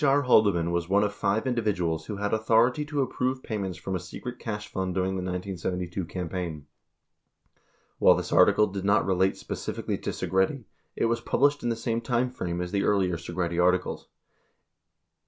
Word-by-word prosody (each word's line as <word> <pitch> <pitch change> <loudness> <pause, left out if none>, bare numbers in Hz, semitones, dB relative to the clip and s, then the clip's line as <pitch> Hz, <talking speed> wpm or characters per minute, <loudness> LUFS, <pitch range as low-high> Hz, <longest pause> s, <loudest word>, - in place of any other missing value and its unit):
R. 140 0 +4
Haldeman 100 -9 +4
was 85 0 -1
one 100 +2 +4
of 105 0 -1
five 105 +3 0
individuals 95 -10 -1
who 105 - -4
had 100 +1 -2
authority 115 +5 +3
to 145 -2 0
approve 130 0 -2
payments 95 -6 -3
from 95 - -4
a - - -1
secret 125 +7 -8
cash 105 -2 -5
fund 95 -1 -3
during 95 0 0
the 95 - -2
1972 90 0 -3
campaign. 85 -3 -5 1.3
While - - +7
this - - -3
article 105 - +6
did 100 -2 -5
not 100 +2 +3
relate 95 0 +2
specifically - - -4
to - - -4
Segretti, 95 +8 0 0.3
it - - +1
was 115 0 0
published 145 +4 +2
in 120 - -1
the 115 - 0
same 115 0 -2
time 125 +1 0
frame 90 -7 -3
as 90 0 -4
the 100 - +1
earlier 95 -4 +2
Segretti 85 +1 -2
articles. 90 0 +1
100 Hz, 175 wpm, -27 LUFS, 90-115 Hz, 1.3 s, While